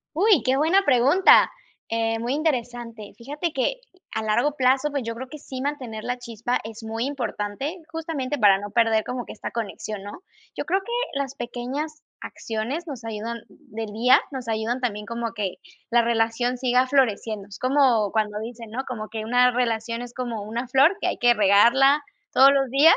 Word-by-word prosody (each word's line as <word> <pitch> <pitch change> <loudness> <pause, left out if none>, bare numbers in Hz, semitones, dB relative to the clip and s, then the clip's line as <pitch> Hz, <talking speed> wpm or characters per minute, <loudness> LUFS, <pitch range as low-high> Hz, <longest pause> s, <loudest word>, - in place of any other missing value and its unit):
Uy, 390 -2 +4
qué 260 +1 +2
buena 335 +7 +4
pregunta, 280 +6 +5 0.4
eh, 225 0 0
muy 235 +3 -2
interesante. 240 -7 -3
Fíjate 295 +7 -4
que, 270 - 0 0.4
a 220 - -1
largo 235 +7 +1
plazo, 265 +1 +2
pues, 280 -3 -3
yo 230 0 -4
creo 255 +3 -7
que 305 - -8
sí 260 -2 -7
mantener 255 -7 -4
la 245 0 -2
chispa 235 0 -2
es 225 +1 -9
muy 225 +2 -3
importante, 270 - -3
justamente 305 -4 -3
para 200 -3 +6
no 205 +1 -7
perder 225 -1 +3
como 250 +1 -4
que - - -9
esta - - -6
conexión, 215 -2 -5
¿no? 205 - -10 0.3
Yo - - -3
creo 380 - +1
que, 470 - -9 0.3
las 275 -1 -3
pequeñas 275 +6 -5 0.2
acciones 235 +10 -4
nos 255 -6 -7
ayudan 225 +1 -4
del 225 -7 -8
día 245 +4 +5
nos 260 -3 -6
ayudan 225 +3 -1
también 210 -4 -2
como 235 0 -4
que, 205 -5 -3 0.3
la 240 0 +5
relación 235 +2 0
siga 250 0 +2
floreciendo. 220 -6 0
Es 205 0 -11
como 255 -6 +3
cuando 210 -1 -1
dicen, 230 0 -8
¿no? 255 +4 -3
Como 215 -4 -5
que: 220 0 -5
"Una 245 +2 +4
relación 230 -1 -1
es 245 0 -8
como 240 -4 -4
una 230 +5 -4
flor, 275 +9 +4
que - - -1
hay - - -1
que 240 0 +5
regarla 235 +8 +5 0.3
todos 270 +1 +7
los 275 -1 +2
días". 285 +5 +7
240 Hz, 185 wpm, -24 LUFS, 225-270 Hz, 0.4 s, todos